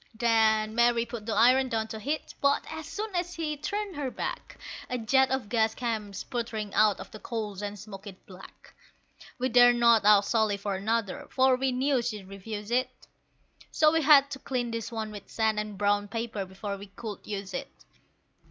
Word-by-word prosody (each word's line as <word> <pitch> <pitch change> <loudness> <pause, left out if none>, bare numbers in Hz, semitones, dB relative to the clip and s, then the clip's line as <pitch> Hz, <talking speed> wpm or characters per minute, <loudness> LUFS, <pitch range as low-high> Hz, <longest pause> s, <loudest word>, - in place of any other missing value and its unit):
Then 220 -2 +2
Mary 235 0 +3
put 235 -2 -8
the 225 - -1
iron 255 +2 +5
down 220 -2 -1
to 220 - -6
heat, 290 +8 -3
but 280 0 +2
as 315 -1 -6
soon 415 +6 -5
as 350 0 -2
she'd 305 -3 -3
turned 405 +2 -3
her 285 -3 -2
back, - - -6 0.3
A 250 - -1
jet 265 +4 +3
of 265 -4 -2
gas 220 0 +1
came 220 -4 -3
sputtering 220 -1 -4
out 215 -2 +4
of - - -9
the 215 - -10
coals 210 -4 -5
and 205 0 -5
smoked 205 0 -10
it 195 -2 -12
black. 185 0 -14 0.6
We 255 - 0
dared 245 0 +6
not 235 -2 +5
ask 205 -1 +5
Sally 220 -3 +2
for 200 0 -3
another, 205 +1 -2
for 260 -1 +4
we 265 +1 0
knew 260 +1 +1
she'd 215 -5 -5
refuse 205 +2 -7
it, 255 +1 +2 0.8
So 310 -1 +4
we 325 0 +2
had 280 -2 +6
to 270 - -5
clean 245 -3 -2
this 230 -1 -4
one 220 -2 -4
with 205 -2 -10
sand 220 -1 0
and 210 -1 -5
brown 205 0 +1
paper 220 -2 -4
before 200 +2 -6
we 200 +1 -10
could 210 0 -7
use 195 -2 -5
it. - - -4
225 Hz, 195 wpm, -28 LUFS, 210-255 Hz, 0.8 s, dared